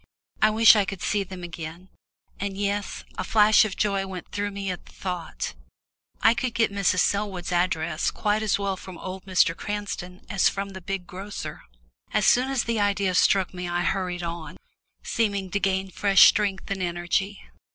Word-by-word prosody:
I 215 - +6
wished 225 +1 +7
I 210 - +4
could 195 -1 -6
see 205 -1 +1
them 185 -1 -9
again, 170 +1 -8 0.5
and 195 -1 -3
yes 200 0 -2 0.2
a - - 0
flash 215 0 +5
of 205 - -5
joy 195 -2 0
went 185 -2 -8
through 205 0 -2
me 200 -1 -4
at 180 - -8
the - - -15
thought 180 -3 -5 0.7
I 225 - +7
could 240 0 -3
get 225 -3 +2
Mrs. 195 -2 +2
Selwood's 200 -4 -1
address 170 -2 0
quite 210 +1 0
as 215 -2 +1
well 200 -1 -1
from 185 -1 -10
old 185 +2 -7
Mr. 180 -3 +3
Cranston 200 -3 -5
as 195 - +3
from 200 0 -4
the 190 -1 -9
big 195 0 -4
grocer! 195 +3 -7 0.5
As - - +2
soon 255 +2 +4
as 270 -2 0
the 230 -1 -1
idea 200 -2 +1
struck 190 +1 +3
me 180 -1 -5
I 175 0 0
hurried 180 0 -1
on, 170 -1 -6 0.5
seeming 200 -4 -1
to 200 - 0
gain 190 -1 0
fresh 195 +1 +5
strength 200 -2 +3
and 195 -1 -2
energy. 175 +3 -1
195 Hz, 185 wpm, -25 LUFS, 180-205 Hz, 0.7 s, wished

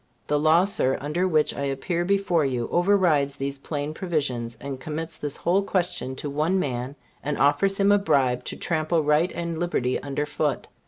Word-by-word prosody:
The 150 - +1
law, 160 +4 +5
Sir, 135 -9 +1
under 160 +6 -1
which 155 -4 +2
I - - -5
appear 140 +6 -1
before 190 -3 +2
you, 125 -4 -1
overrides 175 -7 +3
these 140 0 -4
plain 145 +1 -4
provisions, 140 -10 -2
and 135 0 -6
commits 160 +3 -5
this 145 -2 -5
whole 185 +3 +2
question 180 -9 -1
to 145 - -5
one 155 +6 0
man, 130 -4 -2 0.3
and 150 +1 -2
offers 145 +8 +3
him 200 0 +4
a 205 - +5
bribe 130 -9 +1
to - - -3
trample 160 -1 0
right 150 +4 +2
and 170 -1 -3
liberty 130 -8 0
under 140 +1 -2
foot. 145 -1 -1
150 Hz, 180 wpm, -25 LUFS, 140-175 Hz, 0.3 s, law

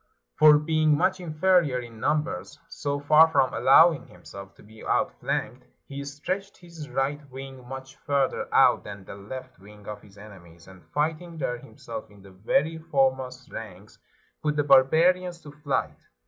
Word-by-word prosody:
For 150 -1 +8
being 155 0 +2
much 185 +5 +1
inferior 165 -4 +2
in 115 -2 -10
num 150 +5 +1
bers, 90 - -7
so 145 0 -3
far 150 +3 +6
from 140 -5 +1
allowing 160 +3 +5
himself 100 +2 -12
to - - -18
be 110 +1 -15
outflanked, - - -2 0.2
he 140 0 -7
stretched 185 +8 -5
his 170 -3 -11
right 140 +2 -1
wing 130 -1 -10
much 135 +1 -9
further 140 -2 -1
out - - +4
than 100 -2 -9
the - - -9
left 130 +6 -9
wing 105 +1 -16
of 105 -1 -7
his 105 -1 -19
enemies, 85 -6 -15
and 95 -2 -15
fighting 160 +3 -2
there 125 -5 -3
himself - - -9
in 100 -1 -18
the 100 - -15
very 140 - 0
foremost 130 -5 -1
ranks, 105 -2 -10 0.4
put 150 -1 -1
the 145 - +1
barbarians 165 +6 +4
to 145 - -11
flight. 145 -1 -3
140 Hz, 160 wpm, -26 LUFS, 110-155 Hz, 0.4 s, For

